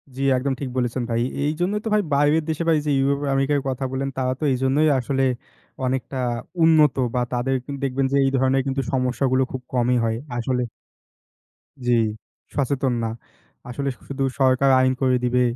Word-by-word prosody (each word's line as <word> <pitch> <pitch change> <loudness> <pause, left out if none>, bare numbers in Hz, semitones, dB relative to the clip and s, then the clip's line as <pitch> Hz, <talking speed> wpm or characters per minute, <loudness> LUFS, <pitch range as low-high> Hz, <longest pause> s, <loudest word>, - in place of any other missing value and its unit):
জি, 135 - -5 0.2
একদম 135 +2 -1
ঠিক 135 - -3
বলেছেন 125 0 -1
ভাই। 115 0 0 0.2
এইজন্যই 175 +8 0
তো - - -1
ভাই 210 - +4
বাইরের 145 +3 +3
দেশে 160 +1 -1
ভাই 165 - +5
এই - - -6
যে - - +2
ইউরোপ 140 +1 +1
আমেরিকার 135 +1 +2
কথা 130 +1 -3
বললেন 135 +1 -2
তারা 130 -1 0
তো - - -5
এইজন্যই 135 +4 +2
আসলে 135 +2 -1 0.6
অনেকটা 130 +1 -2 0.5
উন্নত, 155 -4 +5 0.2
বা - - +2
তাদের 125 +2 0
কিন্তু 140 -1 -6
দেখবেন 135 +1 0
যে 140 - +2
এই 135 - +2
ধরনের 130 +1 +2
কিন্তু 135 0 0
সমস্যা 130 0 0
গুলো 130 0 +3
খুব 130 - -5
কমই 125 0 +2
হয় 115 0 0 0.2
আসলে। 125 +1 -1 1.3
জি, - - +3 0.6
সচেতন 135 -2 0
না। - - 0 0.6
আসলে 140 +3 -3 0.2
শুধু 135 0 -3 0.2
সরকার 130 0 +4
আইন 130 0 +3
করে 130 -1 +3
দিবে। 125 0 +2
135 Hz, 175 wpm, -23 LUFS, 125-140 Hz, 1.3 s, ভাই